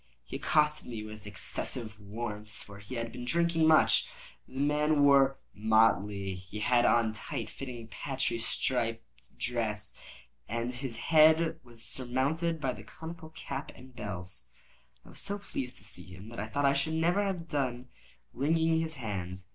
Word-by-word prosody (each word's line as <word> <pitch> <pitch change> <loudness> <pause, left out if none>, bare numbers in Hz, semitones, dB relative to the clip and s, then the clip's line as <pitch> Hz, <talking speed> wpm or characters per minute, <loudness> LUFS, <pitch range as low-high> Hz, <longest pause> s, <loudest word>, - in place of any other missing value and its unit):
He - - -5
accosted 150 0 +2
me 115 -3 -5
with 110 -1 -9
excessive 110 +2 -2
warmth, 105 +1 -5
for 100 -1 -11
he 105 +5 -8
had 115 -1 -3
been 125 - -7
drinking 170 +3 +3
much. 160 -1 +5 0.4
The 130 - -7
man 150 +1 +3
wore 135 -1 +6 0.2
motley. 105 -2 +3
He 95 +3 -7
had 120 +2 +4
on 115 -2 +4
a - - -10
tight 110 - -5
fitting 120 -4 -7
parti 130 +3 -2
striped 115 0 -2
dress, 110 -4 -2 0.5
and 120 +2 -1
his 125 -2 -4
head 160 +2 +5
was 120 -2 -7
surmounted 140 +7 0
by 135 -4 0
the - - -9
conical 165 0 -9
cap 155 -1 -5
and 130 0 -14
bells. 100 -5 -5 0.6
I - - -14
was - - -10
so 200 +1 -1
pleased 130 -11 -5
to - - -11
see 90 +1 -10
him, 95 +4 -10
that 115 - -7
I 105 - -2
thought 140 +5 0
I 140 - +5
should 140 +3 0
never 175 +5 +3
have 185 -4 -2
done 130 -5 -1 0.5
wringing 160 +4 +2
his 160 -1 -2
hand. 95 -7 -4
125 Hz, 165 wpm, -31 LUFS, 110-155 Hz, 0.6 s, wore